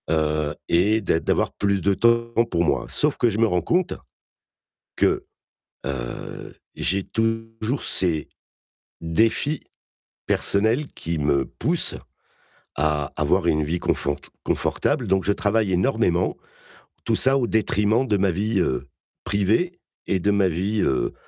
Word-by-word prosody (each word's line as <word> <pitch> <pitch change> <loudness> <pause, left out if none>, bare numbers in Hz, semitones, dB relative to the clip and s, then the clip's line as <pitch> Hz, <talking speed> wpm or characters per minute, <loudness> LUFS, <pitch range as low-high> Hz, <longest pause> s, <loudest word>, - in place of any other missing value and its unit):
Heu 75 -1 +1 0.2
et 105 +6 +3
d'a 85 -4 +1
d'avoir - - 0
plus 100 -1 0
de 100 +3 +2
temps 115 +3 +2
pour 85 -1 +1
moi. 70 -6 +1
Sauf - - +1
que 120 - +3
je 105 - -3
me 115 - +4
rends 90 -5 +1
compte. 180 +1 +1 1.0
Que, - - +2 0.6
heu, 65 -3 -6 0.2
j'ai 95 +2 0
toujours 115 +3 -2
ces 80 -5 +1 0.7
défis 110 - +1 0.6
personnels 110 +8 +1
qui 85 -1 -3
me 70 -2 +2
poussent - - -1 0.8
à 75 -1 0
avoir - - +1
une 75 0 +2
vie 85 +4 -1
confort 70 -3 0 0.3
confortable. - - 0
Donc 95 -1 +1
je 100 - +2
travaille 105 0 +1
énormément, 90 -3 +1 0.7
tout 115 - +2
ça 135 +4 +3
au 130 - +1
détriment 110 +3 +2
de 105 -3 +2
ma 95 -1 +2
vie, 100 +4 0
heu, 65 -8 -1 0.3
privée 110 - +1 0.3
et 95 - +1
de 100 +4 +1
ma 100 -2 +3
vie, 100 +6 -1
heu, 65 - 0
100 Hz, 140 wpm, -23 LUFS, 80-115 Hz, 1.0 s, me